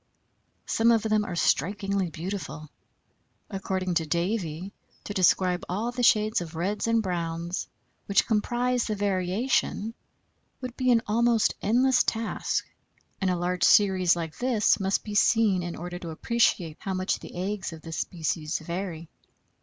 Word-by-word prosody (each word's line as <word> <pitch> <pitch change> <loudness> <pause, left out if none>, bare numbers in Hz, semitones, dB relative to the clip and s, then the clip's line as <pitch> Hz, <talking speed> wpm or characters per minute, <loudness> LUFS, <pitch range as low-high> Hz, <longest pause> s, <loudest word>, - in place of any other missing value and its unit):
Some 230 +1 +3
of 225 -2 +3
them 215 -1 +2
are 175 - -5
strikingly 195 +3 +1
beautiful. 160 -3 -6 0.8
According 190 -2 -2
to 165 -2 0
Davie, 175 +1 -2 0.3
to 205 - -5
describe 185 -1 +3
all 215 +7 -1
the 245 0 -4
shades 215 -3 +4
of 165 -1 -7
reds 195 +7 -1
and 230 -1 +2
browns 170 -1 -3 0.4
which 200 - +3
comprise 245 +3 0
the 215 - -2
variation 205 +3 0 0.7
would 255 -1 -6
be 255 -1 0
an 230 -2 +4
almost 230 +1 +2
endless 250 +4 +3
task, 225 0 -1 0.5
and 190 - +2
a 180 - +1
large 180 0 -1
series 190 -4 +5
like 165 -2 -5
this 245 -4 +2
must 195 0 0
be 210 - -6
seen 205 -2 +3
in 175 -1 -4
order 175 +1 -6
to 170 - -7
appreciate 170 -3 +1
how 190 -1 -3
much 185 0 -1
the - - -11
eggs 190 +1 -3
of 160 -1 -11
this 165 -1 -6
species 160 -1 -2
vary. 170 0 -5
190 Hz, 150 wpm, -27 LUFS, 175-220 Hz, 0.8 s, series